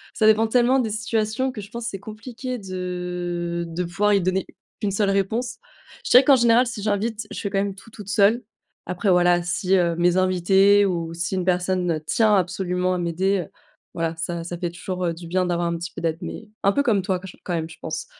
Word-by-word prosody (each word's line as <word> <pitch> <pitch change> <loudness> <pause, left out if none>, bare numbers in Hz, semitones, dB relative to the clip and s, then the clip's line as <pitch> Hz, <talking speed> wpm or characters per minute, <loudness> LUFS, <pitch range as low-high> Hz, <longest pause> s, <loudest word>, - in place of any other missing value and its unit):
ça 220 - +2
dépend 220 +1 +5
tellement 250 +3 +3
des 235 -4 0
situations 220 +3 -1
que 220 - -7
je 200 - -11
pense, 235 0 -6
c'est 195 -4 -5
compliqué 235 +5 -6
de 180 -3 -4
de 165 +2 -3
pouvoir 200 +4 +1
y 200 - +3
donner 185 +1 0 0.4
une 205 - 0
seule 200 0 +1
réponse. 220 +5 -1 0.4
Je - - -5
dirais 250 - +8
qu'en 275 +1 +6
général, 235 +1 +4
si 230 -3 -5
j'invite, 215 +1 -1
je - - -6
fais 200 - -3
quand 195 - +1
même 200 -1 -2
tout 225 +3 -15
toute 210 -2 -10
seule. 210 +4 +3 0.4
Après 180 +3 0
voilà, 175 -1 +4
si, 175 +2 +1
heu, 170 -2 +2
mes 175 +1 +3
invités 190 +2 +4
ou 170 -3 -2
si 170 +3 -2
une 185 -1 -1
personne, 180 -1 +1
heu, 155 - -1
tient 220 +5 +3
absolument 185 0 0
à - - -1
m'aider, 180 +3 0
heu, 160 - -9 0.4
voilà, 165 -1 -2
ça 170 +1 -3
ça 175 +1 -5
fait 175 -1 -3
toujours, 180 +1 -4
heu, 170 - 0
du 170 +1 -10
bien 185 +2 +1
d'avoir 175 -1 0
un 170 0 -1
petit 170 +1 -6
peu - - -7
d'aide. 165 -1 -1
Mais 220 - -7
un 200 - +5
peu 280 - +1
comme 220 -8 +2
toi 185 -1 -1
quand 190 - -10
j 180 - -12
quand 180 - -3
même, 165 -1 -2
je 160 - -12
pense. 160 -1 -4
185 Hz, 235 wpm, -23 LUFS, 175-215 Hz, 0.4 s, dirais